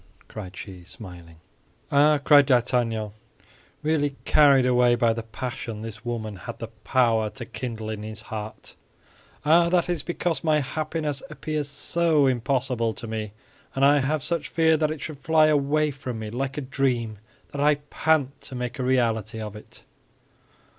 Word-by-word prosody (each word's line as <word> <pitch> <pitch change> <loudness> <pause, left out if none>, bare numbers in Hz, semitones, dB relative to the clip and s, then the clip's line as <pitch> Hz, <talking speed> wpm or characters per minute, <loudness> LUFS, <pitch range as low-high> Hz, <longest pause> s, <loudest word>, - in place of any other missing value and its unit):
cried 95 -4 -8
she, 95 -3 -9
smiling. 90 -3 -11 0.6
"Ah," 150 +1 +5
cried 145 -1 +6
D'Artagnan, 120 -4 +1 0.7
really 145 -2 +1
carried 140 -3 +5
away 125 -1 +4
by 120 -2 +2
the 115 - -4
passion 115 -1 -6
this 110 0 -8
woman 115 -3 -4
had 115 +5 -8
the 115 - -6
power 115 -3 +2
to 120 +2 -8
kindle 110 -1 -6
in 110 -1 -4
his 110 0 -7
heart, 110 -1 -7 0.7
"ah, 170 +3 +5
that 180 -1 +2
is 175 -4 0
because 175 0 -2
my 155 -2 +3
happiness 150 0 -2
appears 155 -1 -3
so 155 +1 +1
impossible 125 -3 0
to - - -8
me; 110 -2 -4 0.4
and 135 +1 +3
I 145 +1 +6
have 145 +1 0
such 170 -4 -2
fear 160 -1 +3
that 155 -1 +1
it 155 -1 -5
should 155 -3 -6
fly 155 +1 +4
away 150 0 +2
from 130 -3 -6
me 110 -1 -6
like 135 +3 -3
a - - -1
dream 125 -5 -1 0.3
that 140 - -4
I 150 +1 +5
pant 145 -1 0
to 130 - -8
make 125 +1 -4
a - - -1
reality 115 -4 +1
of 105 -1 -6
it." 105 - -13
130 Hz, 165 wpm, -25 LUFS, 110-150 Hz, 0.7 s, cried